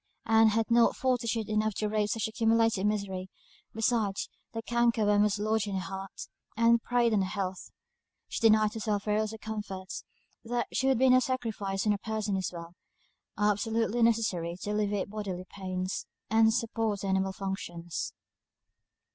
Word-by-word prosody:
Ann 225 0 +5
had 225 +2 +1
not 235 0 +5
fortitude 230 -4 0
enough 215 -1 0
to 215 - -1
brave 210 0 0
such 225 0 0
accumulated 225 -2 +2
misery; 195 -3 -2 0.4
besides, 220 -3 0 0.2
the 225 -1 -5
canker 235 -1 +2
worm 205 0 +4
was 210 -1 +2
lodged 215 0 0
in 200 - -3
her 190 - -1
heart, 195 0 -7 0.3
and 230 0 +5
preyed 240 -1 +2
on 205 - +3
her 190 - 0
health. 190 -3 -4 0.6
She - - -4
denied 215 -1 +4
herself 210 -2 -1
every 210 0 +1
little 220 +1 -3
comfort; 210 -4 -6
things - - -5 0.4
that 240 +1 -1
would 265 -1 +3
be 260 +2 +4
no 255 - +7
sacrifice 220 -6 -2
when 210 - +4
a 200 - -3
person 215 -2 -2
is 190 -1 -1
well, 170 -1 -9 0.6
are 210 0 +4
absolutely 225 +3 0
necessary 205 -7 +1
to 205 - -2
alleviate 205 -1 -1
bodily 195 -4 -4
pain, 185 -2 -4 0.5
and 220 0 +5
support 225 -3 -1
the 195 - -3
animal 190 0 +1
functions. 175 -3 -4
215 Hz, 165 wpm, -29 LUFS, 195-225 Hz, 0.6 s, no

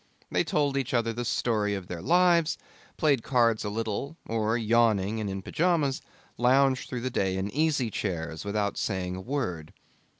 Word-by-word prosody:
They - - +2
told 145 -2 0
each 130 -2 -1
other 115 -1 +1
the 120 +2 -3
story 110 -3 0
of 95 -2 -6
their 90 -2 -6
lives, 170 - +3 0.4
played 140 -6 +3
cards 115 -3 +2
a 105 - -2
little, 115 +8 -3
or, 110 0 0
yawning 110 -2 +2
and 105 -2 -2
in 95 0 -5
pyjamas, 155 - +1 0.4
lounged 130 +1 +3
through 125 - -4
the 130 +1 -2
day 95 -5 0
in 95 +2 -2
easy 145 -4 +1
chairs 80 -6 -3
without 100 0 -1
saying 90 -3 -2
a 95 - -6
word. 95 - -3
115 Hz, 170 wpm, -28 LUFS, 100-135 Hz, 0.4 s, lives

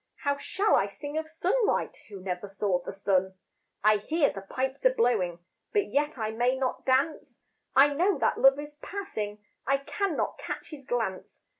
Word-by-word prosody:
How 285 0 +2
shall 395 +8 0
I 195 - +4
sing 290 +9 -6
of 315 0 -6
sunlight 380 +8 +1
Who 200 -3 -9
never 185 +1 -4
saw 195 -2 0
the - - -6
sun? 190 -1 0 0.5
I 215 0 +6
hear 305 +8 +1
the 195 - -6
pipes 260 - -3
a - - +7
blowing, 185 - +1 0.3
But 415 -2 +1
yet 295 0 +1
I 220 -2 -2
may 245 +3 +1
not 260 0 -2
dance, 275 +4 0 0.3
I 280 +2 +7
know 360 +7 +2
that - - +1
Love 270 0 +7
is 295 0 -8
passing, 215 - -5 0.2
I 275 - +4
cannot 375 +4 -2
catch - - -6
his 280 -3 -9
glance. 225 -6 -3
265 Hz, 175 wpm, -28 LUFS, 205-305 Hz, 0.5 s, a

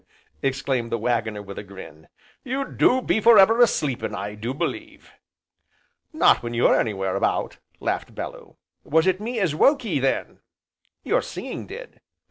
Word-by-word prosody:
exclaimed 135 -3 -1
the - - 0
Waggoner 110 -2 -1
with 100 0 -8
a - - -7
grin, 95 -6 -12 0.4
"you 265 +2 -2
do 255 -1 +2
be 220 - +1
for 230 +1 +7
ever 225 +5 +6
a 240 - +8
sleepin' 130 - -2
I 105 0 -5
do 110 +4 -5
believe!" 310 - -5 1.0
"Not 315 - +4
when 120 0 -5
you're 120 - +4
anywhere 95 -4 -1
about!" - - -1 0.2
laughed - - -3
Bellew. - - -8 0.3
"Was 160 +2 +2
it 185 +1 +1
me 235 +2 -3
as 185 -7 +1
woke 275 - +3
ye 165 -10 0
then?" 135 0 -1 0.6
"Your - - +1
singing - - -7
did." - - -10
135 Hz, 160 wpm, -23 LUFS, -, 1.0 s, a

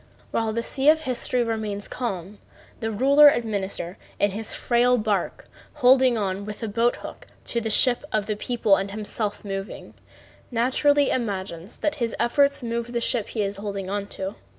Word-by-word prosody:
While 225 -1 0
the 230 +1 -2
sea 270 +4 +2
of 315 0 +5
history 250 -2 0
remains 215 -3 -3
calm 200 -5 -5 0.4
the 225 - -2
ruler 280 +7 +6
administrator 200 -7 -2 0.2
in 205 - +2
his 215 +2 -4
frail 245 +1 +2
bark, 210 -4 -2 0.3
holding 255 -3 +4
on 195 -1 -2
with 210 +2 -7
a - - -1
boat 230 +3 +1
hook - - -10 0.2
to 235 - -1
the 225 - -2
ship 245 +4 +3
of 215 -2 0
the 215 - -2
people 215 -2 +2
and 195 +1 -3
himself 210 0 -4
moving, 195 0 -6 0.6
naturally 270 +4 +2
imagines 195 -5 -4
that 305 0 -1
his 230 -1 -1
efforts 280 +4 +2
move 235 0 -3
the 235 - 0
ship 235 -2 +1
he 215 - -2
is 200 0 -3
holding 200 -2 -5
on 200 0 -2
to. 195 0 -5
225 Hz, 175 wpm, -24 LUFS, 200-245 Hz, 0.6 s, ruler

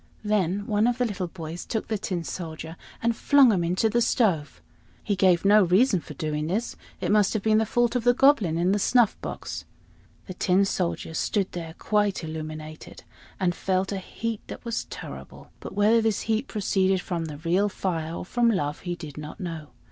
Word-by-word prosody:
Then 205 -2 0
one 210 +2 +2
of 245 0 +1
the 250 - +1
little 195 -5 -3
boys 165 -1 -7
took 220 - -3
the 220 - -1
Tin 180 -3 -3
Soldier 160 -1 -6 0.3
and 235 0 +2
flung 275 0 +5
him 185 -5 +1
into 180 +6 +1
the 235 +2 +1
stove. 185 -11 +1 0.4
He 205 - 0
gave 185 -1 +3
no 210 +1 +7
reason 190 +4 +3
for 150 - -10
doing 150 +1 -2
this. 210 +8 -2 0.2
It - - -1
must 210 -2 +4
have 215 -3 -2
been 215 0 +4
the 220 - 0
fault 240 +2 +1
of 245 - 0
the 245 +1 +4
Goblin 235 - +4
in 175 +2 +2
the 205 - +2
snuff 240 +1 +3
box. - - -6 0.6
The 185 - -7
Tin 185 +2 +2
Soldier 175 -3 -2
stood 195 +4 0
there 165 -2 -6
quite 205 -4 0
illuminated, 155 0 -7 0.4
and 180 -2 +1
felt 190 +1 -1
a 195 - -2
heat 225 +3 -4
that - - -9
was 230 -1 -2
terrible; - - -10
but - - -8
whether 215 +3 +4
this 220 -2 0
heat 225 +4 -1
proceeded 190 -2 +1
from 170 -3 -3
the 150 -2 -7
real 175 +6 +1
fire 165 -4 -3
or - - -5
from 240 +4 +2
love 150 -9 -1
he 175 -2 -4
did 150 -4 -9
not 150 0 -8
know. 165 -4 -5
190 Hz, 200 wpm, -26 LUFS, 170-220 Hz, 0.6 s, no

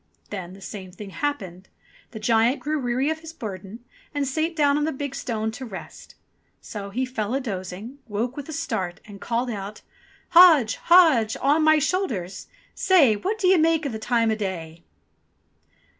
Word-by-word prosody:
Then 185 -3 -6
the 195 - -14
same 190 -1 -8
thing 195 +2 -10
happened. 190 -10 -4 0.4
The 225 - -9
giant 230 +4 +2
grew 305 +1 -2
weary 255 +3 0
of 315 - -4
his 320 0 -10
burden, 210 - -8 0.3
and 285 -1 0
sate 315 +5 -1
down 290 -2 +3
on 295 - +1
the 315 - 0
big 280 -1 -5
stone 220 -5 -3
to 260 +4 -8
rest. 215 -6 -10 0.4
So 200 -2 -7
he 250 +6 -1
fell 235 -2 -3
a - - +1
dozing, 205 +2 -6
woke 230 +4 -2
with 290 +1 -7
a - - -4
start, 220 - -3
and 200 -2 -12
called 240 +1 -1
out: 205 0 -7 0.5
"Hodge, 320 -10 +7
Hodge, 315 -11 +5
on 290 +4 +3
my 310 0 +6
shoulders! 270 - -2 0.3
Say 300 - +4
What 395 - -2
d'ye 375 -3 +4
make 325 0 +3
the 220 - -5
time 230 0 +1
o' - - +1
day 170 -5 -5
240 Hz, 175 wpm, -24 LUFS, 205-295 Hz, 0.5 s, Hodge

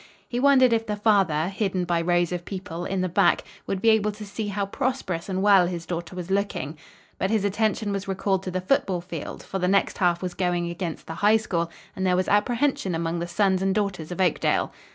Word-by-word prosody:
He 240 - -2
wondered 260 -2 +5
if 225 0 0
the 210 - -1
father, 195 -7 +2
hidden 195 -2 -1
by 170 -1 +1
rows 175 0 +1
of 175 -1 -3
people, 180 -2 -6
in 190 -1 -1
the 185 - +1
back, 180 0 +3 0.2
would 195 -1 -3
be 225 - +6
able 210 -1 +2
to 210 0 -9
see 205 +1 -4
how 200 0 -1
prosperous 200 -6 -2
and 190 0 -1
well 195 -4 +6
his 170 -2 -5
daughter 170 0 -5
was 180 0 -6
looking. 195 -6 -1 0.4
But 190 - 0
his 215 -2 +1
attention 210 +1 0
was 195 -1 -3
recalled 195 0 0
to - - -2
the 185 0 -2
football 185 -4 +1
field, 170 -3 -7
for 195 - -4
the 180 - +1
next 195 +1 +2
half 175 -1 +2
was 180 -1 -3
going 175 -2 -1
against 170 -2 -5
the 160 - -6
High 210 +6 +4
School, 170 -6 -2 0.3
and 190 - -3
there 185 -1 +3
was 185 +1 0
apprehension 220 - +1
among 165 +1 -2
the 170 - -3
sons 190 +1 +1
and 190 0 +1
daughters 195 -6 -2
of 180 - -5
Oakdale. 180 -4 +1
190 Hz, 225 wpm, -25 LUFS, 175-205 Hz, 0.4 s, be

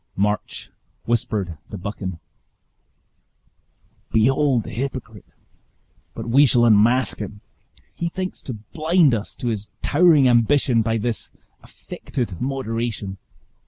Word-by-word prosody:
March 105 +2 -2 0.3
whispered 105 -8 -1
to 105 - -6
Buchan, 95 -2 -5 1.9
"Behold 130 +2 +3
the - - -8
hypocrite! 115 -3 -5 0.9
But 115 0 -6
we 135 +5 +5
shall 120 -1 +4
unmask 115 +4 +4
him. 105 -1 -7 0.5
He 170 - -3
thinks 185 +2 -5
to 130 - -6
blind 155 - +2
us 105 -3 -3
to 120 - -3
his 105 -2 -4
towering 150 -3 +5
ambition, 120 0 +3
by 115 +1 0
this 115 +1 -2 0.3
affected 115 -10 -6
moderation. 115 -7 -3
115 Hz, 110 wpm, -22 LUFS, 105-135 Hz, 1.9 s, we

